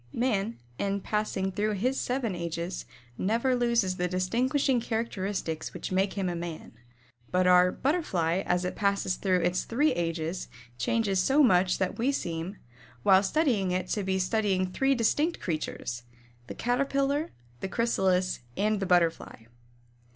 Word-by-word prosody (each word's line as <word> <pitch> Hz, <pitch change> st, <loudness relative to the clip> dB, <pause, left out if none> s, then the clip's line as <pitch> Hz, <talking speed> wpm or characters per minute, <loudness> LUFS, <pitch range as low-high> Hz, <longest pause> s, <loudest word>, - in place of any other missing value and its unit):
Man, 230 Hz, -3 st, 0 dB, 0.2 s
in 200 Hz, 0 st, -1 dB
passing 210 Hz, -3 st, -1 dB
through 210 Hz, +3 st, 0 dB
his 250 Hz, +7 st, 0 dB
seven 245 Hz, -5 st, -1 dB
ages 170 Hz, +1 st, -4 dB, 0.3 s
never 235 Hz, +6 st, +1 dB
loses 235 Hz, -6 st, +1 dB
the 180 Hz, -, 0 dB
distinguishing 240 Hz, +8 st, +1 dB
characteristics 200 Hz, -8 st, -3 dB
which -, -, -5 dB
make 190 Hz, +1 st, +1 dB
him 195 Hz, -2 st, -2 dB
a 175 Hz, -, -2 dB
man, 170 Hz, -1 st, -6 dB, 0.6 s
but 185 Hz, 0 st, +2 dB
our 180 Hz, 0 st, +6 dB
Butterfly 190 Hz, -, 0 dB
as 180 Hz, 0 st, +1 dB
it 180 Hz, -, -3 dB
passes 200 Hz, -2 st, +1 dB
through 185 Hz, -2 st, +1 dB
its 175 Hz, +2 st, +1 dB
three 290 Hz, +6 st, +2 dB
ages 165 Hz, 0 st, -2 dB, 0.3 s
changes 195 Hz, -, +1 dB
so 275 Hz, +9 st, +4 dB
much 185 Hz, -6 st, +4 dB
that 190 Hz, +2 st, -2 dB
we 255 Hz, +4 st, +2 dB
seem, 175 Hz, -5 st, -4 dB, 0.5 s
while 190 Hz, -1 st, +6 dB
studying 215 Hz, -, +1 dB
it 180 Hz, 0 st, -1 dB
to 210 Hz, -, 0 dB
be 190 Hz, 0 st, 0 dB
studying 190 Hz, 0 st, +1 dB
three 270 Hz, +7 st, +2 dB
distinct 295 Hz, +8 st, +1 dB
creatures 155 Hz, -7 st, -4 dB, 0.5 s
the -, -, -7 dB
Caterpillar, 275 Hz, +4 st, 0 dB, 0.3 s
the -, -, -3 dB
Chrysalis, 190 Hz, -5 st, +1 dB, 0.2 s
and 210 Hz, 0 st, +1 dB
the 195 Hz, -, -2 dB
Butterfly. 170 Hz, -9 st, +1 dB
195 Hz, 145 wpm, -28 LUFS, 180-235 Hz, 0.6 s, our